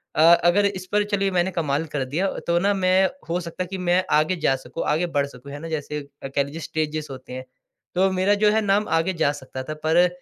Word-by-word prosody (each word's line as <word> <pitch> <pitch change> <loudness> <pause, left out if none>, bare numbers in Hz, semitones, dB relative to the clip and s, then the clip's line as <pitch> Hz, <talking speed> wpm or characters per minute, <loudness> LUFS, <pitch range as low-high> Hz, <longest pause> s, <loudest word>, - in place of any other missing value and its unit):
अ, - - +3
अगर 175 +4 +5
इस 190 -2 -2
पर 210 0 +3
चलिए 195 -1 +1
मैंने 180 +1 +1
कमाल 155 -2 -1
कर 135 -3 -1
दिया 180 +6 +1 0.2
तो 170 0 +2
ना 200 +3 +2
मैं 190 0 +3 0.2
हो 175 - 0
सकता 175 +1 -5
कि 190 +2 -6
मैं 180 0 +2
आगे 155 +4 +3
जा 135 -4 +2
सकूँ, 130 +5 -6
आगे 160 +4 +1
बढ़ 145 -4 0
सकूँ 140 0 -12
है 145 - -6
ना। 165 - -7
जैसे 150 -1 -3 0.2
कह 135 +1 0
लीजिए 150 +4 -8
स्टेजेस 155 0 -3
होते 130 -1 -9
हैं। 130 0 -6 0.5
तो 190 +2 +3
मेरा 190 +2 +2
जो 210 - +6
है 220 +1 +2
नाम 205 +1 +1
आगे 165 +3 +1
जा 160 -4 +2
सकता 130 -2 -7
था। 155 +3 -5
पर 175 +3 +5
170 Hz, 235 wpm, -23 LUFS, 150-185 Hz, 0.5 s, जो